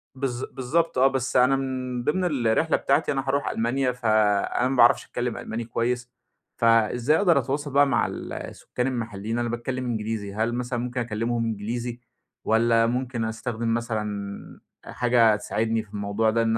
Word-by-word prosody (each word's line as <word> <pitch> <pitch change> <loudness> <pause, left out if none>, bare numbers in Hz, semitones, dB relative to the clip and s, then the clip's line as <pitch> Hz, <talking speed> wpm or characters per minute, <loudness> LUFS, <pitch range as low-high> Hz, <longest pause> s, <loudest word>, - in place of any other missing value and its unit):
بالض 130 -2 -3
بالضبط 135 +4 0
آه، 130 +1 +6
بس 135 -1 -2
أنا 130 +2 +5
من 130 -2 -3
ضمن 170 +8 0 0.2
الرحلة 160 +9 +2
بتاعتي 155 - +1
أنا 135 -1 -2
هاروح 140 +1 0
ألمانيا، 125 +3 0
فأنا 110 -1 +2
ما 135 - -1
باعرفش 120 -1 +5
أتكلّم 120 -1 -3
ألماني 115 +1 -4
كويّس، 120 +2 -2 0.5
فإزاي 115 +5 +3
أقدر 175 -6 +4
أتواصل 140 +3 -3
بقى 140 0 +5
مع - - +2
ال - - -6
السكان 125 +1 -4
المحلّيين؟ 115 -2 -3
أنا 120 -1 -1
باتكلّم 125 +2 -3
إنجليزي، 110 -3 -3
هل 115 +2 0
مثلًا 125 0 -2
ممكن 125 +1 -3
أكلّمهم 115 0 -1
إنجليزي، 115 +3 -3 0.5
والّا 115 +1 +3
ممكن 125 -1 -2
أستخدم 115 0 -2
مثلًا 105 -4 -4 0.3
حاجة 120 -3 +3
تساعدني 110 +1 -1
في 110 - -22
الموضوع 105 +2 0
ده 115 +1 +2
إن 115 0 +1
120 Hz, 160 wpm, -25 LUFS, 110-130 Hz, 0.5 s, آه